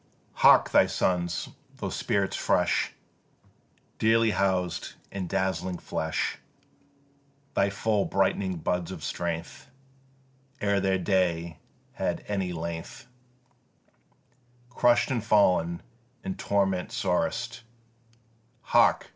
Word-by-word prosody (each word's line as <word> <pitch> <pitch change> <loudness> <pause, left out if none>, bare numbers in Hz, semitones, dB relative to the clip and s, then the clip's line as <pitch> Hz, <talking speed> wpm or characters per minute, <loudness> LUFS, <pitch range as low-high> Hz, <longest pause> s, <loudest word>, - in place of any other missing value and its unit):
Hark! - - +6
thy - - +5
sons, 85 -1 -1 0.3
those - - -4
spirits - - 0
fresh - - +1 1.1
Dearly 115 0 +4
housed 95 -2 -1 0.2
in 95 -2 -4
dazzling 95 0 -1
flesh, 80 -2 -2 1.1
Thy 100 - +2
full 100 +1 0
brightening 95 -1 0
buds 85 +1 -2
of 90 -5 -7
strength, 85 +2 -4 0.9
Ere 100 -1 +1
their 95 -1 +1
day 85 -3 0 0.3
had - - -3
any 95 -3 -1
length 85 +7 -6 1.7
Crush'd, 120 +1 +3
and 120 -5 -1
fallen 90 -6 +3 0.4
in 190 - -3
torment 95 - 0
sorest, 115 +7 -1 1.0
Hark! - - +3
95 Hz, 95 wpm, -27 LUFS, 85-100 Hz, 1.7 s, Hark